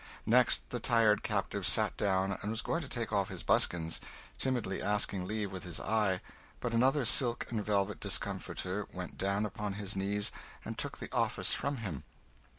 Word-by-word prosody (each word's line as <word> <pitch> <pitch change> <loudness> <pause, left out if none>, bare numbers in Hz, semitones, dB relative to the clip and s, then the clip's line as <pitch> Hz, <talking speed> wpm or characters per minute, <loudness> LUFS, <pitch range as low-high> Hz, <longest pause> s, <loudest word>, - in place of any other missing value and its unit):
Next 125 +2 +4
the 125 - -2
tired 115 -3 +4
captive - - -2
sat - - +3
down 95 -1 +1
and 105 - -3
was 115 +1 -2
going 165 - -1
to 145 - -6
take 115 -4 -3
off 100 -2 +1
his - - -6
buskins, 80 -1 +3 0.4
timidly 125 -8 0
asking 100 -3 0
leave 105 -1 -2
with 95 -1 -6
his 90 -3 -3
eye, 105 -4 +1 0.4
but 120 -1 -2
another 130 +4 +3
silk 120 -1 +3
and 110 -3 -1
velvet 100 -1 0
discomforter 95 +1 -2
went 90 -1 -6
down 100 +2 +1
upon 105 -1 -4
his 100 0 -4
knees 100 +1 +1 0.3
and - - -4
took - - -2
the - - -7
office - - +1
from 140 0 -2
him. 75 -9 -5
105 Hz, 175 wpm, -32 LUFS, 95-115 Hz, 0.4 s, Next